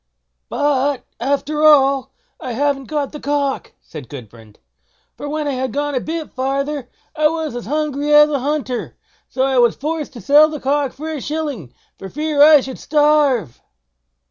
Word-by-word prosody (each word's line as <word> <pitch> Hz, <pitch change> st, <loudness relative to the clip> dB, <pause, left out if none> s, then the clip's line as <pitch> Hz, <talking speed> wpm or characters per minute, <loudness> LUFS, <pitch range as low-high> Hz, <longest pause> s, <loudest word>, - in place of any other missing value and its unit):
"But, 285 Hz, -1 st, 0 dB
after 285 Hz, +4 st, -1 dB
all, 275 Hz, -3 st, +4 dB, 0.3 s
I 250 Hz, -, -5 dB
haven't 275 Hz, +2 st, -1 dB
got 290 Hz, 0 st, -3 dB
the 300 Hz, -, -8 dB
cock", 285 Hz, -1 st, -2 dB
said 145 Hz, -7 st, -11 dB
Gudbrand; 115 Hz, -5 st, -12 dB, 0.6 s
"for 290 Hz, -, -7 dB
when 305 Hz, 0 st, -2 dB
I -, -, 0 dB
had 260 Hz, -1 st, -3 dB
gone 290 Hz, +1 st, -2 dB
a 255 Hz, -, 0 dB
bit 320 Hz, +3 st, -5 dB
farther, 275 Hz, 0 st, -2 dB, 0.3 s
I 310 Hz, -, 0 dB
got 315 Hz, -2 st, 0 dB
as 240 Hz, -3 st, -6 dB
hungry 295 Hz, 0 st, -1 dB
as 295 Hz, 0 st, +7 dB
a 285 Hz, -, 0 dB
hunter, 275 Hz, -2 st, -3 dB, 0.3 s
so 260 Hz, -, -1 dB
I 265 Hz, -1 st, +2 dB
was 240 Hz, -2 st, +4 dB
forced 305 Hz, +1 st, -4 dB
to 235 Hz, -, -10 dB
sell 295 Hz, +9 st, +5 dB
the 305 Hz, -1 st, -6 dB
cock 280 Hz, 0 st, 0 dB
for 310 Hz, +3 st, -8 dB
a 300 Hz, -4 st, -5 dB
shilling, 290 Hz, -, -4 dB, 0.3 s
for 195 Hz, -, -8 dB
fear 300 Hz, +2 st, -1 dB
I 300 Hz, -1 st, +8 dB
should 260 Hz, -1 st, -8 dB
starve." 290 Hz, -, +2 dB
285 Hz, 170 wpm, -18 LUFS, 260-300 Hz, 0.6 s, I